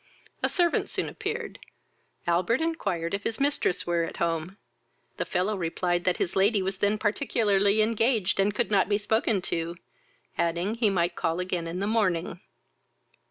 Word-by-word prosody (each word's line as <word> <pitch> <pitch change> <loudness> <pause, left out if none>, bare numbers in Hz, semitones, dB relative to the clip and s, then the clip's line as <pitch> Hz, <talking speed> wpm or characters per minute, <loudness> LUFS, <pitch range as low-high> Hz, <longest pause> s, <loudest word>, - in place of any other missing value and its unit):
A - - +2
servant 345 -2 +1
soon - - -2
appeared; 445 +3 -5 0.7
Albert 175 +8 +2
inquired 195 - -2
if 200 - -1
his 220 - -3
mistress 280 -9 +1
were 170 -1 +1
at 165 - -5
home. 170 +3 -2 0.6
The - - -1
fellow 190 +4 0
replied 175 0 -1
that 180 - +2
his 175 - -2
lady 200 +1 +3
was 190 0 -3
then 205 +1 +2
particularly 210 -2 +2
engaged, 225 -3 +1
and 195 +1 +3
could 205 0 -1
not 195 -1 +3
be 205 - +3
spoken 215 -2 0
to, 170 0 -2 0.6
adding, 170 +4 0
he 230 -2 +2
might 175 -2 0
call 165 +2 -1
again 180 -2 -2
in 170 +2 -4
the - - 0
morning. 185 -6 0
195 Hz, 160 wpm, -27 LUFS, 175-220 Hz, 0.7 s, lady